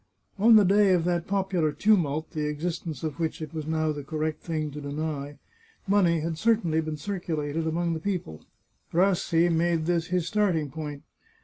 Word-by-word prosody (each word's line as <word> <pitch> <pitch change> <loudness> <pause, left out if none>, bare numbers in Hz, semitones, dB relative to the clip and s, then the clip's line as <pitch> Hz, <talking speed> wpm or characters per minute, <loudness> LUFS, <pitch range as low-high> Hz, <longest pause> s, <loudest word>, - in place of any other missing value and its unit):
On 225 +3 +7
the 210 -2 +7
day 200 0 +5
of 175 -2 +2
that 175 -1 -1
popular 190 -5 0
tumult, 160 -3 +1
the 150 -1 -2
existence 160 -1 -4
of 155 0 -4
which 160 -1 -2
it 155 -1 -7
was 155 -2 -5
now 155 -1 0
the 145 -1 -5
correct 155 +1 -3
thing 155 -3 -3
to 150 +1 -7
deny, 145 0 -4 0.5
money 180 -5 +3
had 165 0 -3
certainly 195 -8 +2
been 155 -1 -4
circulated 160 -4 -3
among 170 +1 0
the 160 - -3
people, 165 - -4 0.5
Rassi 175 -2 +3
made 165 -1 +1
this 170 -1 0
his 180 -2 0
starting 180 -8 0
point. 150 -2 -6
160 Hz, 175 wpm, -27 LUFS, 155-180 Hz, 0.5 s, On